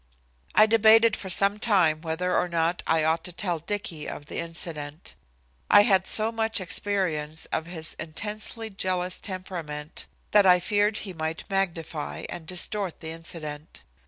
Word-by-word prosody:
I 215 Hz, -, +8 dB
debated 225 Hz, 0 st, +6 dB
for 190 Hz, -, -7 dB
some 200 Hz, +3 st, +3 dB
time 175 Hz, -9 st, +3 dB
whether 175 Hz, +2 st, -1 dB
or 180 Hz, -, +1 dB
not 170 Hz, +1 st, 0 dB
I 160 Hz, -1 st, +3 dB
ought 160 Hz, +1 st, +1 dB
to 180 Hz, -, -5 dB
tell 175 Hz, -2 st, -2 dB
Dicky 165 Hz, -3 st, -5 dB
of 145 Hz, -, -8 dB
the -, -, -5 dB
incident. 165 Hz, -2 st, -4 dB, 0.6 s
I 205 Hz, -, +8 dB
had 190 Hz, -4 st, +3 dB
so 220 Hz, +1 st, +5 dB
much 225 Hz, -1 st, 0 dB
experience 175 Hz, -5 st, -1 dB
of 160 Hz, -, -2 dB
his 160 Hz, -2 st, -5 dB
intensely 215 Hz, +7 st, -4 dB
jealous 185 Hz, -1 st, -1 dB
temperament 170 Hz, -6 st, -6 dB, 0.2 s
that 205 Hz, -2 st, +6 dB
I 180 Hz, -1 st, +7 dB
feared 205 Hz, +3 st, +1 dB
he 190 Hz, -, -6 dB
might 160 Hz, 0 st, -3 dB
magnify 165 Hz, -, -2 dB
and 160 Hz, -2 st, -7 dB
distort 185 Hz, +1 st, -2 dB
the 160 Hz, -1 st, -6 dB
incident. 155 Hz, -2 st, -7 dB
180 Hz, 155 wpm, -26 LUFS, 160-205 Hz, 0.6 s, I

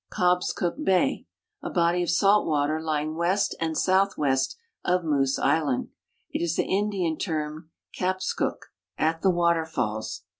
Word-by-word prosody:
Cobscook 180 Hz, -, 0 dB
bay, 230 Hz, +5 st, +1 dB, 0.3 s
a -, -, -4 dB
l)ody 175 Hz, 0 st, +2 dB
of 175 Hz, -, -1 dB
salt 200 Hz, +4 st, +4 dB
water 155 Hz, 0 st, +1 dB
lying 155 Hz, -1 st, -2 dB
west 180 Hz, +4 st, +1 dB
and 160 Hz, -1 st, -1 dB
southwest 150 Hz, -9 st, +1 dB, 0.3 s
of 180 Hz, 0 st, +1 dB
ISIoose 140 Hz, -4 st, +1 dB
island. 145 Hz, -3 st, +1 dB, 0.4 s
It -, -, -2 dB
is 170 Hz, -1 st, 0 dB
the -, -, +1 dB
Indian 190 Hz, -5 st, 0 dB
term 155 Hz, -2 st, -3 dB, 0.3 s
kapskuk, 185 Hz, +1 st, -2 dB, 0.3 s
"at 160 Hz, +1 st, 0 dB
the 195 Hz, -, +3 dB
waterfalls." 160 Hz, -11 st, 0 dB
170 Hz, 135 wpm, -26 LUFS, 155-185 Hz, 0.4 s, salt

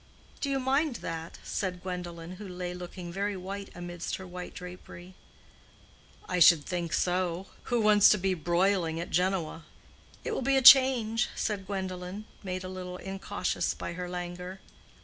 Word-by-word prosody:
"Do 280 Hz, -, -1 dB
you 275 Hz, -1 st, +1 dB
mind 270 Hz, +2 st, +1 dB
that?" 165 Hz, 0 st, -5 dB
said 180 Hz, -3 st, -3 dB
Gwendolen, 180 Hz, -1 st, -6 dB
who 205 Hz, 0 st, -8 dB
lay 180 Hz, -1 st, -5 dB
looking 180 Hz, -1 st, -7 dB
very 200 Hz, +1 st, -1 dB
white 195 Hz, +2 st, -6 dB
amidst 175 Hz, -1 st, -4 dB
her 190 Hz, -, -8 dB
white 180 Hz, 0 st, -8 dB
drapery. 180 Hz, 0 st, -10 dB, 1.1 s
"I 180 Hz, -, 0 dB
should 165 Hz, -2 st, +7 dB
think 175 Hz, -2 st, -3 dB
so. 180 Hz, 0 st, 0 dB, 0.2 s
Who 240 Hz, -1 st, +1 dB
wants 210 Hz, -1 st, +7 dB
to 210 Hz, -, +5 dB
be 190 Hz, 0 st, +1 dB
broiling 175 Hz, 0 st, +1 dB
at 170 Hz, -, -5 dB
Genoa?" 180 Hz, -2 st, 0 dB, 0.6 s
"It -, -, -3 dB
will 440 Hz, -, -1 dB
be 270 Hz, +2 st, +3 dB
a -, -, +4 dB
change," 245 Hz, -4 st, +7 dB
said 200 Hz, -3 st, -2 dB
Gwendolen, 190 Hz, +1 st, -4 dB, 0.2 s
made 185 Hz, -2 st, -4 dB
a -, -, -5 dB
little 180 Hz, -1 st, -6 dB
incautious 195 Hz, +1 st, -2 dB
by -, -, -5 dB
her 180 Hz, +1 st, -5 dB
languor. 180 Hz, +1 st, -6 dB
185 Hz, 160 wpm, -29 LUFS, 175-200 Hz, 1.1 s, should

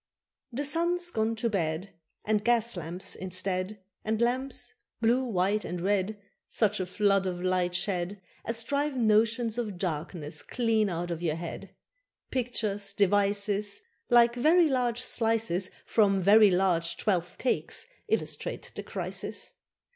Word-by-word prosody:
The 275 Hz, +5 st, -2 dB
sun's 345 Hz, +3 st, +3 dB
gone 225 Hz, -2 st, 0 dB
to 225 Hz, +1 st, -1 dB
bed, 180 Hz, -2 st, -2 dB, 0.3 s
And 210 Hz, -1 st, +1 dB
gas 235 Hz, -1 st, +2 dB
lamps 175 Hz, +2 st, -3 dB
instead, 185 Hz, +2 st, -3 dB, 0.2 s
And 220 Hz, 0 st, -1 dB
lamps 250 Hz, +1 st, -1 dB, 0.3 s
blue, 235 Hz, +3 st, +3 dB
white, 210 Hz, -2 st, 0 dB
and 175 Hz, +1 st, -4 dB
red, 200 Hz, +3 st, 0 dB, 0.3 s
Such 210 Hz, -2 st, +1 dB
a 185 Hz, -, -2 dB
flood 195 Hz, 0 st, +2 dB
of 180 Hz, -1 st, -3 dB
light 180 Hz, -1 st, 0 dB
shed 185 Hz, 0 st, -2 dB, 0.2 s
As 230 Hz, 0 st, -1 dB
drive 285 Hz, +2 st, -1 dB
notions 225 Hz, +1 st, +2 dB
of 210 Hz, -6 st, -3 dB
darkness 165 Hz, -2 st, -4 dB
clean 225 Hz, -4 st, +1 dB
out 175 Hz, 0 st, -3 dB
of 170 Hz, -1 st, -4 dB
your 160 Hz, -3 st, 0 dB
head. 165 Hz, +1 st, -7 dB, 0.6 s
Pictures, 210 Hz, -5 st, -1 dB
devices, 205 Hz, +1 st, +2 dB, 0.3 s
Like 235 Hz, -1 st, +6 dB
very 315 Hz, +8 st, +4 dB
large 245 Hz, -3 st, 0 dB
slices 225 Hz, -7 st, 0 dB, 0.2 s
From 200 Hz, -3 st, +3 dB
very 205 Hz, +3 st, +7 dB
large 180 Hz, -3 st, +1 dB
twelfth 180 Hz, -5 st, -1 dB
cakes, 260 Hz, -, -1 dB, 0.2 s
illustrate 445 Hz, -, -2 dB
the -, -, -5 dB
crisis. -, -, -5 dB
205 Hz, 135 wpm, -28 LUFS, 185-235 Hz, 0.6 s, very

